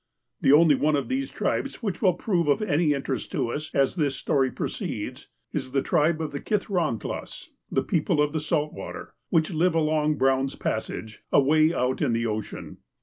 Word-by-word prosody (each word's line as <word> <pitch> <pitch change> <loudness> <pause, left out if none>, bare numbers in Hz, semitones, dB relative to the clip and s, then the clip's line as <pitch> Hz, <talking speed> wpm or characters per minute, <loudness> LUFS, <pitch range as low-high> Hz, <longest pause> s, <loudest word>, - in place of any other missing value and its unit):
The - - +4
only 155 +1 +7
one 150 +2 +2
of 140 - -2
these 270 +1 -1
tribes - - -2
which 195 -5 -2
will 185 -5 +4
prove 175 -4 0
of 145 +9 +2
any 155 -5 +2
interest 135 -3 -3
to 115 - 0
us, 150 +4 -4
as 135 +3 +2
this 145 -4 +1
story 135 0 +1
proceeds, - - -5 0.2
is 130 - -4
the 135 -1 +2
tribe 155 +2 +2
of 155 - -3
the 140 - -4
Kithrahtlas 180 - -2 0.2
(the - - +1
people 165 -1 0
of 150 0 +2
the 155 - -1
salt 150 -1 -1
water), 95 - -8 0.2
which 160 +2 +2
lived 165 +2 +2
along 155 -1 +2
Brown's 135 -1 +1
Passage, 110 -1 -4
away 155 +3 +4
out 130 -5 -1
in - - +2
the 115 0 0
ocean. 110 -1 -5
150 Hz, 185 wpm, -26 LUFS, 135-165 Hz, 0.2 s, only